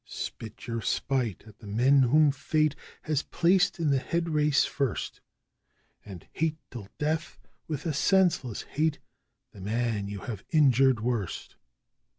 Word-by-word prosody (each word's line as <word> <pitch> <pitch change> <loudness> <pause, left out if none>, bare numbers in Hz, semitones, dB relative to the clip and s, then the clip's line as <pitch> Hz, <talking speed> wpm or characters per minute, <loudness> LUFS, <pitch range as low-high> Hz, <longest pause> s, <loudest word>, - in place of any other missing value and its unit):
Spit 110 0 -7
your 115 -1 -3
spite 125 -5 -1
at 110 -1 -16
the 110 - -12
men 130 +7 +4
whom 145 +4 +5
Fate 155 +2 0 0.3
has 150 -3 0
placed 180 +3 +2
in 155 -3 +1
the 135 - +3
head 170 +5 -2
race 150 -2 +3
first, 135 -6 -3 0.8
And 95 -5 -10
hate 160 -1 -1
till 110 -6 -8
death, 155 +2 -2 0.3
with 150 -1 -4
a 160 - 0
senseless 165 - +2
hate, 155 +1 -1 0.5
the 100 - -13
man 110 0 -1
you 100 -1 -6
have 110 -6 -6
injured 135 -6 +4
worst! 115 -5 -3
135 Hz, 145 wpm, -28 LUFS, 115-155 Hz, 0.8 s, whom